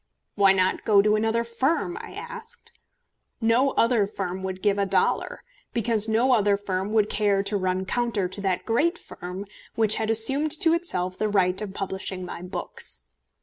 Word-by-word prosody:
"Why 200 Hz, -2 st, +5 dB
not 185 Hz, -1 st, +1 dB
go 200 Hz, -2 st, +5 dB
to 210 Hz, 0 st, +3 dB
another 225 Hz, +2 st, +1 dB
firm?" 270 Hz, +9 st, -1 dB
I -, -, -10 dB
asked. 475 Hz, 0 st, -9 dB, 0.7 s
No 235 Hz, +4 st, +3 dB
other 230 Hz, -4 st, +2 dB
firm 190 Hz, -2 st, -5 dB
would 190 Hz, 0 st, -5 dB
give 205 Hz, -1 st, +2 dB
a 200 Hz, -, +2 dB
dollar, -, -, 0 dB, 0.3 s
because 225 Hz, -2 st, +1 dB
no 235 Hz, +4 st, +3 dB
other 205 Hz, -4 st, +3 dB
firm 195 Hz, 0 st, -3 dB
would 215 Hz, -2 st, +3 dB
care 205 Hz, -2 st, +1 dB
to 205 Hz, +1 st, -2 dB
run 185 Hz, -1 st, -1 dB
counter 230 Hz, -3 st, 0 dB
to 185 Hz, +2 st, -7 dB
that 190 Hz, -2 st, -1 dB
great 315 Hz, +10 st, +1 dB
firm 180 Hz, -, -8 dB, 0.3 s
which 220 Hz, -1 st, +3 dB
had 220 Hz, 0 st, -1 dB
assumed 270 Hz, +7 st, +3 dB
to 330 Hz, -3 st, +4 dB
itself 185 Hz, -, 0 dB
the 215 Hz, -, 0 dB
right 190 Hz, -2 st, +1 dB
of 200 Hz, -2 st, -6 dB
publishing 190 Hz, -1 st, -4 dB
my 175 Hz, -, -7 dB
books. 180 Hz, -, -5 dB
210 Hz, 175 wpm, -25 LUFS, 190-230 Hz, 0.7 s, Why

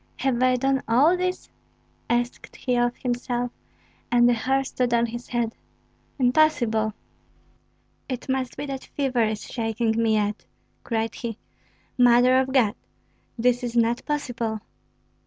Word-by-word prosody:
"Have 255 Hz, -3 st, 0 dB
I 255 Hz, 0 st, +4 dB
done 270 Hz, +1 st, +1 dB
all 275 Hz, +10 st, +5 dB
this?" 365 Hz, 0 st, -2 dB, 0.6 s
asked 240 Hz, +1 st, -2 dB
he 250 Hz, -2 st, -1 dB
of 240 Hz, 0 st, +1 dB
himself; 245 Hz, -1 st, -2 dB, 0.6 s
and 240 Hz, 0 st, +5 dB
the 245 Hz, -, +5 dB
hair 265 Hz, +4 st, +1 dB
stood 250 Hz, -2 st, 0 dB
on 235 Hz, 0 st, +3 dB
his 235 Hz, +1 st, -7 dB
head. 235 Hz, -2 st, -1 dB, 0.6 s
"Impossible! 245 Hz, -6 st, +2 dB, 1.1 s
It 255 Hz, -2 st, -4 dB
must 260 Hz, -1 st, -2 dB
be -, -, -4 dB
that 270 Hz, -2 st, -5 dB
fever 265 Hz, -4 st, +1 dB
is 215 Hz, -1 st, -2 dB
shaking 225 Hz, -1 st, -1 dB
me 220 Hz, -1 st, +3 dB
yet," 210 Hz, 0 st, -1 dB, 0.4 s
cried 225 Hz, -1 st, -1 dB
he. 230 Hz, -3 st, -5 dB, 0.6 s
"Mother 245 Hz, +1 st, +6 dB
of 265 Hz, 0 st, 0 dB
God, 240 Hz, -6 st, +3 dB, 0.6 s
this 245 Hz, +1 st, +2 dB
is 240 Hz, -1 st, -2 dB
not 235 Hz, +1 st, +2 dB
possible!" 240 Hz, -7 st, -2 dB
245 Hz, 140 wpm, -24 LUFS, 230-260 Hz, 1.1 s, Mother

